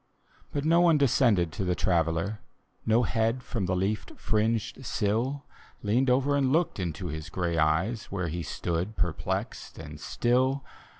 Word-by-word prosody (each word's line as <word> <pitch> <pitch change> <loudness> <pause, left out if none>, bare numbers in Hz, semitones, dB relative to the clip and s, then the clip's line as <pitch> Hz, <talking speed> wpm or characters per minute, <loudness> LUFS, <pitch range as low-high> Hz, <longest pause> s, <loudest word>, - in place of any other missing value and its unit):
But 145 0 -2
no 165 +2 +5
one 170 -3 +5
descended 115 - +3
to 95 - -3
the 90 -1 +1
Traveller; 85 +4 0 0.5
No 115 +2 +4
head 115 +2 0
from 105 -8 -2
the 90 - +1
Icaf 100 +4 -2
fringcd 110 +3 0
sill 120 +6 -1 0.4
Leaned 120 +6 +2
over 135 +3 +3
and 135 -2 +2
looked 165 -6 +1
into 90 0 -3
his 80 0 -5
gray 85 -2 -1
eyes, 85 +9 +1
Where 90 -3 -3
he 85 +2 -3
stood 85 +5 -3
perplexed 85 -3 -2
and 75 -2 -9
still. 130 - +1
105 Hz, 155 wpm, -28 LUFS, 85-130 Hz, 0.5 s, no